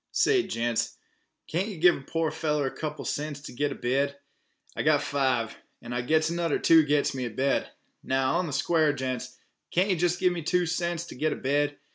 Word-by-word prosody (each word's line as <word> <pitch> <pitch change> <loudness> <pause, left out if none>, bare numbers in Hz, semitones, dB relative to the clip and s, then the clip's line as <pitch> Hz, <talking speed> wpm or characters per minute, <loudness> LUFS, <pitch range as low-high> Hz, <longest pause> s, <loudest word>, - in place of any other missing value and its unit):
"Say, 400 -3 +4
gents, 115 - -2 0.5
can't 180 +5 -1
yeh 205 -5 -6
give 175 +2 +5
a - - -8
poor 160 +3 -1
feller 150 -2 0
a 130 - -1
couple 150 -2 -4
of - - -5
cents 150 -1 -3
t' 145 - -10
git 145 +3 -1
a - - -4
bed? 140 +3 0 0.6
I - - -2
got - - +3
five, 130 -5 0 0.2
and 120 - -7
I 120 - 0
gits 155 +5 +2
anudder 170 -2 0
two 165 -1 +6
I - - +5
gits 145 0 +2
me 130 -2 -3
a - - -3
bed. 135 +5 0 0.3
Now, 130 +4 +1
on 180 -3 -2
th' 140 - -3
square, 160 -3 +2
gents, 130 -1 -4 0.3
can't 190 +3 +2
yeh - - +3
jest 175 +1 +1
gimme 180 -2 +1
two 180 +3 +1
cents 170 0 -2
t' - - -10
git 155 +4 0
a - - -5
bed? 145 +2 0
150 Hz, 220 wpm, -27 LUFS, 135-170 Hz, 0.6 s, two